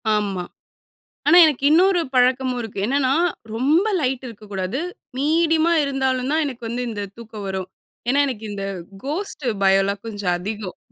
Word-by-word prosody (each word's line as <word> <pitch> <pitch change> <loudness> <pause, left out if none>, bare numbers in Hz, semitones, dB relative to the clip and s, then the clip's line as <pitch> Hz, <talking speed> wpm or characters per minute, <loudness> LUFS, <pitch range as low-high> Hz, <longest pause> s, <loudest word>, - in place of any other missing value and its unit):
ஆமா. 200 -3 -1 0.8
ஆனா. 350 - +7
எனக்கு 285 -3 0
இன்னொரு 360 +2 +5
பழக்கமும் 255 0 +2
இருக்கு. 220 -3 -6
என்னான்னா, 265 +1 +2 0.4
ரொம்ப 305 - +3
லைட்டு 260 -2 -1
இருக்கக்கூடாது. 205 0 -5 0.4
மீடியமா 325 +3 +3
இருந்தாலும் 265 -2 0
தான் 315 +1 +2
எனக்கு 250 -4 -6
வந்து 245 +2 -2
இந்த 210 -2 -4
தூக்கம் 220 -3 -9
வரும். 190 -1 -3 0.4
ஏன்னா 275 +3 +3
எனக்கு 225 -5 -5
இந்த 200 -1 -4 0.4
கோஸ்ட் 305 -2 -3 0.2
பயம் 195 0 +5
எல்லாம் 200 +1 -3
கொஞ்சம் 205 -5 -2
அதிகம். 205 0 -6
250 Hz, 145 wpm, -22 LUFS, 205-285 Hz, 0.8 s, ஆனா